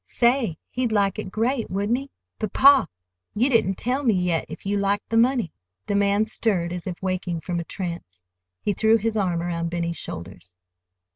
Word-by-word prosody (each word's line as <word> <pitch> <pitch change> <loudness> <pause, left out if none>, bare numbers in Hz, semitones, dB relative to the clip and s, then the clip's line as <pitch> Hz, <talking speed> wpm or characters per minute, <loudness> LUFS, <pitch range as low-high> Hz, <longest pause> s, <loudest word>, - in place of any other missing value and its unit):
"Say, 235 - +2
he'd 250 -2 -1
like 200 -3 +1
it - - -5
great, 230 +3 0
wouldn't 205 +6 0
he? 275 +1 -9 0.3
But, 215 -3 -3
pa, 275 0 +6 0.5
you 250 +6 +2
didn't 220 -5 +3
tell 250 +8 -1
me 235 -7 +2
yet 180 -3 0
if - - -9
you 200 +1 0
liked 200 +1 0
the 225 - -1
money." 235 - +2 0.3
The - - -2
man 200 +1 +3
stirred, 195 -6 -1
as 180 0 -6
if 180 -2 -5
waking 185 -3 -2
from 175 -1 -3
a - - -3
trance. 170 - -6 0.4
He 205 - +1
threw 220 +3 +4
his 225 +1 -1
arm 180 -5 0
around 170 -1 -2
Benny's 170 -1 -2
shoulders. 90 -4 -8
200 Hz, 190 wpm, -24 LUFS, 175-225 Hz, 0.5 s, pa